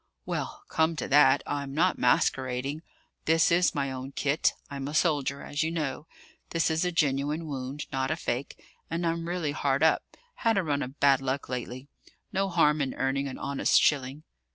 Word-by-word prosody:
"Well, - - -4
come 160 +1 +1
to - - -3
that, 140 -1 +5
I'm 140 -1 -4
not 180 +4 +2
masquerading. 135 -1 +1 0.4
This 165 +1 +4
is 175 0 +3
my 140 -2 -1
own 130 +1 -6
kit; 145 +3 +1
I'm 140 -1 -5
a 150 - -5
soldier, 145 -4 +1
as 145 - -3
you 160 - +1
know. 150 -3 -3 0.4
This 165 -1 +1
is 160 +1 +1
a 180 - 0
genuine 150 0 0
wound, 140 0 -5
not 135 -1 -1
a 155 - +1
fake; 135 -4 -4 0.3
and 170 +1 -2
I'm 165 0 -1
really 175 -4 -1
hard 140 0 0
up: 160 - +4 0.4
had 225 -2 +2
a 195 - +2
run 145 -3 -1
of 130 +3 -6
bad 135 -1 +4
luck 135 +1 -3
lately. 125 +1 -5 0.5
No 195 0 +1
harm 155 -4 +3
in 135 -2 -2
earning 135 +1 0
an 130 - -6
honest 140 0 +2
shilling." 140 0 +1
145 Hz, 185 wpm, -28 LUFS, 135-160 Hz, 0.5 s, that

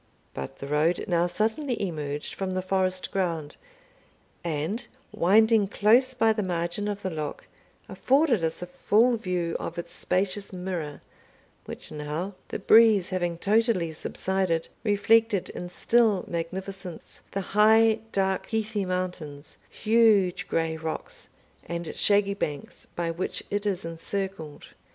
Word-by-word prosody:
But 70 - -6
the - - -7
road 150 +5 +1
now 175 -1 +2
suddenly 225 - -1
emerged 150 -6 -3
from 190 -1 -3
the 185 0 -2
forest 185 -1 0
ground, 165 -6 -2 0.9
and, 170 - -2 0.2
winding 215 +3 +4
close 240 +6 +3
by 225 -2 +4
the 215 - -1
margin 175 +2 -2
of 205 -1 -4
the 185 - -2
loch, 155 -2 -5 0.4
afforded 265 - +2
us 160 +2 -2
a - - -3
full 215 +7 +3
view 180 -6 -2
of 170 - -5
its 170 0 -5
spacious 190 +3 -1
mirror, 180 -6 -5 0.6
which - - -8
now, 155 +6 -4
the - - -4
breeze 215 -5 +5
having 175 -2 -1
totally 205 -3 +2
subsided, 175 +1 -1
reflected 215 -1 +3
in 175 - -6
still 220 +1 +2
magnificence 185 +1 -5
the 195 - -3
high 220 +1 +5
dark 190 -1 0
heathy 220 -2 -1
mountains, 180 -6 -4
huge 215 -5 +3
grey 165 -1 0
rocks, 160 0 -5 0.4
and 170 -1 -4
shaggy 200 -1 +3
banks, 150 -8 -5
by 170 -1 -1
which 170 +3 -3
it 205 +1 -1
is 190 -4 -1
encircled. 165 -1 -5
185 Hz, 130 wpm, -27 LUFS, 170-210 Hz, 0.9 s, breeze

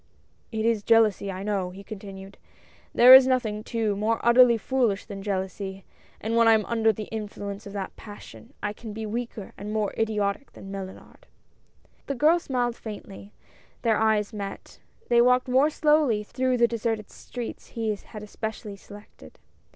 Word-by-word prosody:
"It 220 -1 -2
is 230 -2 +2
jealousy, 215 -3 +3
I 190 +1 -6
know," 200 -3 -1
he 190 +2 -11
continued; 195 -2 -10 0.5
"there 250 +2 +8
is 260 0 +10
nothing, 225 -5 0
too, 220 -3 -1
more 220 +3 0
utterly 235 0 +6
foolish 230 -3 0
than 200 -2 -8
jealousy, 190 -1 -4 0.3
and 225 +2 -2
when 230 0 +5
I 225 - +7
am 215 -1 +2
under 225 -1 +2
the 215 0 -6
influence 205 -1 -6
of 200 - -9
that 195 -2 -5
passion, 215 +3 -12
I 210 0 -1
can 220 0 -9
be 220 +1 -5
weaker 230 -1 -5
and 205 +1 -6
more 215 -2 -1
idiotic 210 +2 -1
than 195 - -10
Mellunard! 190 -1 -9 0.4
" - - -36
The 275 - -2
girl 310 +6 +4
smiled 245 -6 -1
faintly. 205 -2 -9 0.5
Their 225 -3 +3
eyes 220 -1 +1
met. 200 -2 -7 0.3
They 235 0 +5
walked 250 +1 +3
more 260 +4 +4
slowly 300 -8 +2
through 255 +3 -1
the 235 0 +4
deserted 225 -2 -3
streets 245 -2 -8
he 225 -2 -2
had 210 +1 -11
especially 210 -1 -6
selected. 205 - -14
220 Hz, 165 wpm, -26 LUFS, 205-235 Hz, 0.5 s, is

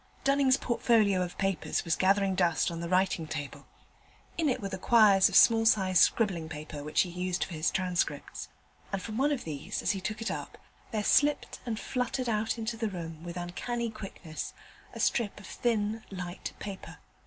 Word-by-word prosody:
Dunning's 275 -1 +4
portfolio 220 -6 +2
of 180 -1 -4
papers 195 -3 -1
was 165 - +2
gathering 195 0 +2
dust 175 -1 +2
on 165 - -5
the 170 0 -4
writing 185 -3 +1
table. 150 -3 -6 0.7
In 320 -3 +1
it 255 - 0
were 200 -3 -4
the 190 - -5
quires 205 -4 +6
of 195 - -4
small 225 +1 +7
sized 190 -5 +4
scribbling 180 -8 +2
paper 150 -1 -7
which 150 - +2
he 180 - -1
used 180 +1 -2
for 180 - -7
his 155 +1 +1
transcripts: 180 -2 -2 0.4
and 195 - -1
from 215 +3 -6
one 290 +2 +3
of 280 -4 -1
these, 150 -3 -5
as - - +2
he 195 -3 -3
took 215 +3 -4
it 225 - -2
up, - - -6 0.3
there 215 -3 -2
slipped 295 +6 +2
and 220 -2 -2
fluttered 250 0 -2
out 220 0 0
into 225 +1 -3
the 220 -1 -1
room 165 -4 -7
with 175 0 -6
uncanny 230 +7 -3
quickness, 190 -7 -7 0.4
a - - -9
strip 220 -5 0
of 200 - -12
thin 220 0 -1
light 180 -2 -6
paper. 195 -2 -8
195 Hz, 190 wpm, -29 LUFS, 175-225 Hz, 0.7 s, small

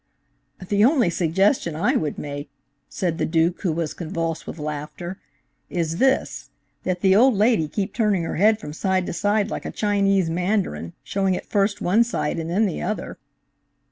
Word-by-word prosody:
"The 205 +1 +3
only 245 - +4
suggestion 175 - +1
I 170 +6 +1
would 150 -2 -1
make," 145 0 -6 0.4
said 175 -3 -2
the - - +1
Duke, 165 +2 +1
who 185 - 0
was 160 -1 -2
convulsed 165 -1 -4
with - - -6
laughter, 150 +4 -5 0.5
"is 165 -2 -2
this; 265 +4 +1 0.3
that 180 -1 -2
the 190 -1 +5
old 245 +3 +5
lady 210 -6 +3
keep 195 +6 -3
turning 210 -6 +1
her 165 - -3
head 215 +4 +4
from 150 - -7
side 190 +2 0
to - - -4
side 205 +4 +1
like - - -4
a - - -3
Chinese 195 -3 +2
Mandarin, 175 - -1
showing 195 -2 0
first 200 0 +1
one 205 +7 +4
side 235 -9 -2
and 165 0 -4
then 200 +6 +2
the 190 - -2
other." 215 - -4
185 Hz, 175 wpm, -23 LUFS, 165-205 Hz, 0.5 s, the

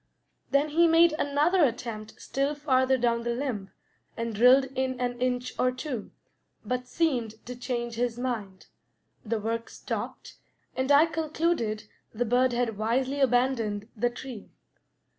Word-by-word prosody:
Then 280 +2 +2
he 335 +3 +4
made 330 0 +5
another 300 +6 +3
attempt 230 -4 -2
still 275 +2 -1
farther 265 -2 +2
down 235 -1 +1
the 235 0 -2
limb, 240 -7 -3 0.5
and 230 0 -3
drilled 250 +5 +6
in 260 -1 -1
an 245 -1 -2
inch 250 0 -1
or 255 - +3
two, 255 -3 -5 0.6
but 250 0 -2
seemed 250 -8 0
to 250 - -6
change 240 -1 -3
his 240 -1 -1
mind; 220 -7 -4 0.6
the 225 0 -1
work 230 +2 -3
stopped, - - -6 0.4
and 260 +2 0
I 290 +3 +7
concluded 315 -8 -1 0.3
the 245 +3 0
bird 250 +2 +3
had 240 -3 -1
wisely 260 +5 0
abandoned 245 -5 +1
the 240 +2 +1
tree. 240 -3 -9
250 Hz, 140 wpm, -28 LUFS, 230-275 Hz, 0.6 s, I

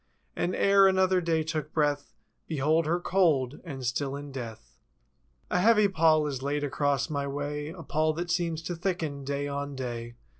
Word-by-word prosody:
And 180 - -1
e'er 195 0 +5
another 190 -1 +3
day 165 -2 +1
took 155 -1 -3
breath— 145 -2 0 0.3
Behold 155 +1 +1
her 170 +2 +1
cold 160 -8 +1
and 135 -7 -6
still 135 +3 -1
in 145 0 -7
death. 110 - -8 0.7
A 180 - +2
heavy 210 +1 +5
pall 160 -4 +3
is 135 -3 -3
laid 145 +2 -1
across 140 -1 0
my 140 -2 -2
way. 145 +1 -4
A 165 0 -9
pall 155 +2 +1
that 175 +2 -3
seems 170 -2 -1
to 175 - -3
thicken, 165 -5 -3
day 140 +1 -2
on 140 0 -4
day. 120 -2 -5
150 Hz, 175 wpm, -28 LUFS, 140-170 Hz, 0.7 s, e'er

